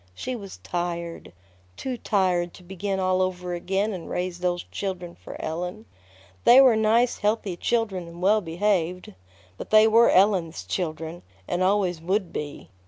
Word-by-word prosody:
She 255 - -4
was 200 -5 -9
tired. 170 -1 -4 0.5
Too 260 -1 -3
tired 185 -6 0
to 180 - -14
begin 195 +2 -3
all 185 0 +2
over 180 -1 -2
again 195 +4 -1
and 180 -3 -7
raise 180 0 -3
those 175 -1 -1
children 180 -3 -4
for - - -11
Ellen. 160 -7 -4 0.6
They 245 +2 +8
were 260 -4 +7
nice, 225 +3 +2
healthy 210 -3 0
children 195 -3 -1
and 170 +1 -11
well 205 +4 +3
behaved; 180 - -1 0.4
but - - -8
they 215 0 +7
were 230 +2 +6
Ellen's 185 -4 +3
children, 165 -1 -4 0.3
and 175 - -1
always 185 -3 +1
would 185 +1 -1
be. 145 -8 -6
185 Hz, 155 wpm, -25 LUFS, 175-210 Hz, 0.6 s, They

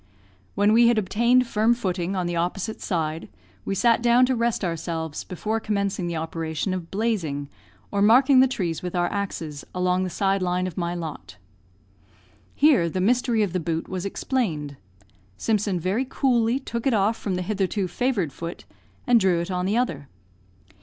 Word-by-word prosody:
When 205 +1 +3
we 235 +1 +6
had 235 -1 +3
obtained 235 +5 +3
firm 225 +1 +2
footing 185 -4 -2
on 180 -2 -1
the 175 0 -2
opposite 180 +5 -2
side, 160 -3 -2 0.4
we 195 - -1
sat 235 +3 +3
down 240 +1 +5
to 260 0 0
rest 235 -3 0
ourselves 165 -2 -3
before 215 +5 -3
commencing 200 -4 -1
the 170 - -3
operation 160 +2 -3
of 175 -3 -5
"blazing," 180 -10 -2 0.4
or 200 - 0
marking 255 +5 +6
the 260 - +6
trees 180 -10 -3
with 180 0 -5
our 175 0 +2
axes, 165 -7 -4
along 180 0 +1
the 185 - -2
side 195 +1 0
line 180 0 0
of 185 -3 -5
my 175 -1 -2
lot. 145 - -7 1.2
Here 270 - +4
the 185 - -3
mystery 230 +2 +2
of 190 -4 -2
the 185 - 0
boot 165 0 -3
was 185 -1 -4
explained. 185 - -2 0.6
Simpson 205 -4 0
very 200 +10 -1
coolly 240 -3 +2
took 235 -2 -4
it 255 - +3
off 210 +2 +2
from 200 -4 -3
the 180 - -2
hitherto 195 0 -1
favoured 195 - -1
foot, 170 +1 -7 0.4
and 245 -1 +5
drew 185 -4 +2
it 170 +2 -3
on 180 0 -1
the 210 +4 +1
other. 165 - -1
190 Hz, 175 wpm, -24 LUFS, 170-230 Hz, 1.2 s, we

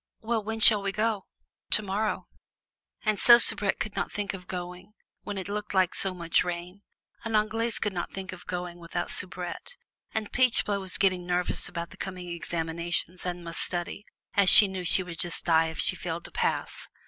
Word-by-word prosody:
"Well, 225 -1 -1
when 220 +1 -4
shall 215 -1 +8
we 200 0 -1
go?" 210 -1 -1 0.4
"Tomorrow." 210 +1 0 0.8
And 215 -1 +1
so 235 0 +9
Soubrette 205 -4 +2
could 215 - -4
not - - -2
think 205 -1 -3
of 180 -2 -9
going 180 +2 -7 0.3
when 205 -1 -6
it 190 -2 -4
looked 210 0 -4 0.2
so 190 -1 0
much 170 -1 +1
like - - +3
rain, 180 +2 -6 0.4
and 225 -1 -2
Anglaise 220 +1 0
could 210 - -2
not 175 -1 -4
think 190 0 -7
of 180 -1 -13
going 175 -1 -5
without 175 +1 -4
Soubrette, 185 - -3 0.4
and 220 -2 -3
Peachblow 230 -5 +2
was 190 -1 -5
getting 185 -2 +1
nervous 180 0 0
about 170 0 -6
the 200 - -14
coming 185 -2 -6
examinations, 170 +1 -2
and 175 -1 -4
must 170 0 -5
study, 175 +3 -3 0.3
as 200 -2 +6
she 210 - +9
knew 190 -1 -5
she 185 - +3
would 170 -2 -9
just 175 -1 -1
die 165 -1 +4
if 160 - -7
she - - +3
failed - - -5
to - - -9
pass. - - -2
185 Hz, 190 wpm, -27 LUFS, 175-210 Hz, 0.8 s, so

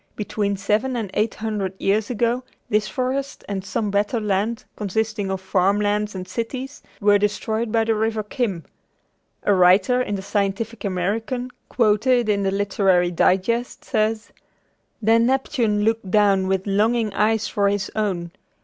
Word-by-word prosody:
Between 205 -1 -2
seven 215 +7 0
and 220 -5 -3
eight 215 +1 0
hundred 205 -4 -3
years 205 +2 +1
ago, 240 +1 0 0.3
this 210 0 +2
forest 260 +6 -3
and 195 -2 -3
some 205 +1 -2
better 205 +4 +1
lands 210 +2 -1
consisting 215 0 -2
of 190 0 -2
farm 195 +1 +2
lands 210 0 0
and 185 -1 -6
cities, 260 +4 -5 0.2
were 205 0 +4
destroyed 220 +2 -1
by 225 0 +3
the 225 0 +1
River 220 0 -1
Chim. 205 -6 -2 0.8
A 205 - +3
writer 190 +7 +4
in 205 -5 -2
the 190 - -5
Scientific 205 +3 -2
American, 220 +7 -2 0.2
quoted 235 +1 +2
in 200 -1 +2
the 195 - +1
Literary 195 -3 +2
Digest, 195 +8 +1
says: 215 +1 -1 0.7
"Then 230 +2 +4
Neptune 245 -5 +1
looked 225 -2 0
down 195 -2 +3
with 190 0 0
longing 215 +2 +1
eyes 215 +1 +1
for 200 -1 +1
his 200 -1 -2
own. 185 -6 -1
210 Hz, 150 wpm, -22 LUFS, 195-225 Hz, 0.8 s, were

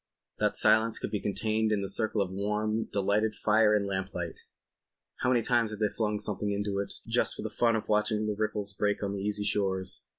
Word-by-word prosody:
That - - +1
silence 110 +1 +3
could - - -5
be 105 - -1
contained 110 +2 0
in 105 -2 +1
the 100 - -3
circle 110 0 +1
of 95 - -7
warm, 105 +3 -1
delightful 105 +2 0
fire 105 0 +4
and 100 -1 +1
lamplight. 95 -3 -4 0.8
How 125 - 0
many 120 -2 +3
times 120 -2 +2
hadn't 105 0 -1
they - - -10
flung 105 -2 0
something 105 0 -1
into 100 0 -1
it 100 0 -3
just - - +2
for - - -6
the - - -4
fun 115 -1 +2
of 110 - -3
watching 105 0 +1
the 105 - 0
ripples 105 -1 -2
break 105 +1 -1
on 100 - -1
the 100 - -4
easy 105 0 0
shores. 95 -2 0
105 Hz, 210 wpm, -29 LUFS, 100-110 Hz, 0.8 s, fire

